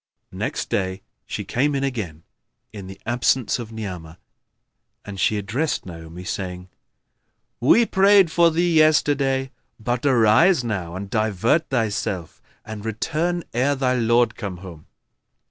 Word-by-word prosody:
Next - - -4
day 95 0 -2 0.2
she - - -5
came 140 +4 0
again, 110 - -3 0.5
in 100 -3 -8
the 95 0 -10
absence 120 +1 +1
of 115 -2 -7
Ni'amah, 90 -7 -7 0.9
and 100 -2 -8
she 105 +3 +2
addressed 125 +10 -2
Naomi, 85 0 -9
saying, 90 -1 -5 0.9
"We 225 - +5
prayed 195 -3 +4
for 170 0 +5
thee 170 +1 +1
yesterday; 140 -4 +3 0.3
but 120 +2 -2
arise 130 - +4
now 95 -7 -4
and 95 +2 -5
divert 110 - +1
thyself 105 -8 -2 0.2
and 110 -1 -7
return 160 +10 -2
ere 130 +5 +1
thy 130 -2 +1
lord 120 0 +2
come 100 -5 -6
home." 85 -4 -11
115 Hz, 130 wpm, -22 LUFS, 95-140 Hz, 0.9 s, We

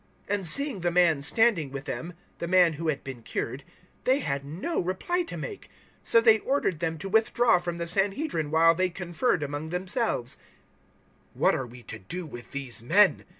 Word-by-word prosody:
004:014 205 - +2
And 195 -4 -1
seeing 280 - +4
the 175 0 0
man 170 -4 +3
standing 175 -1 +2
with 135 0 -6
them 175 +2 -5 0.3
the 170 - -3
man 180 -2 +4
who 160 +2 -5
had 150 -3 -1
been 130 -3 -8
cured 130 +4 -4 0.4
they 260 +2 +3
had 140 - -3
no 170 - -3
reply 190 - -1
to 340 - -6
make. 420 -5 -7
004:015 - - -34 0.3
So 230 - +4
they 225 -1 +6
ordered 255 - -1
them 165 -1 -2
to 185 +5 -6
withdraw 225 0 +3
from 175 -1 -4
the 170 - -3
Sanhedrin 195 - -1
while 165 +2 +5
they 185 +2 0
conferred 180 +1 -1
among 145 +2 -4
themselves. 180 - -2 1.0
004:016 - - -17
"What - - +4
are 130 - -2
we 120 +1 -13
to 110 - -9
do 175 - -6
with 120 -5 -10
these 130 -5 -5
men?" 190 - +4
175 Hz, 195 wpm, -27 LUFS, 145-205 Hz, 1.0 s, they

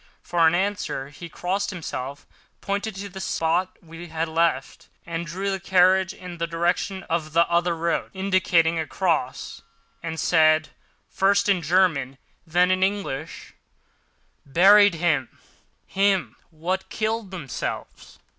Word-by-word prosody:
For 175 - -3
answer 185 -6 -2
he 170 +4 -10
crossed 185 +4 -2
himself, 140 -6 -6 0.3
pointed 200 +1 -3
to 200 +1 -6
the 190 0 -9
spot 180 +1 -1
we 165 +1 -10
had 160 0 -2
left 160 -4 -1 0.2
and 170 0 -4
drew 190 +5 -3
his 195 -1 -3
carriage 190 0 +4
in 180 -2 -10
the 170 - -1
direction 175 +3 -1
of 160 -2 -3
the 170 +1 +4
other 170 0 +1
road, 170 +1 -1
indicating 180 -4 +2
a 160 - -3
cross, 165 -9 -2 0.4
and 160 -1 -5
said, 155 -1 +3 0.4
first 200 +1 +2
in 195 -3 +2
German, 155 -6 +1 0.3
then 180 +3 +3
in 185 0 +1
English: 190 -6 -3 0.9
"Buried 195 +6 +6
him—him 175 +5 -2
what 180 +4 -3
killed 220 -1 -2
themselves." 170 -9 -6
175 Hz, 125 wpm, -24 LUFS, 160-190 Hz, 0.9 s, Buried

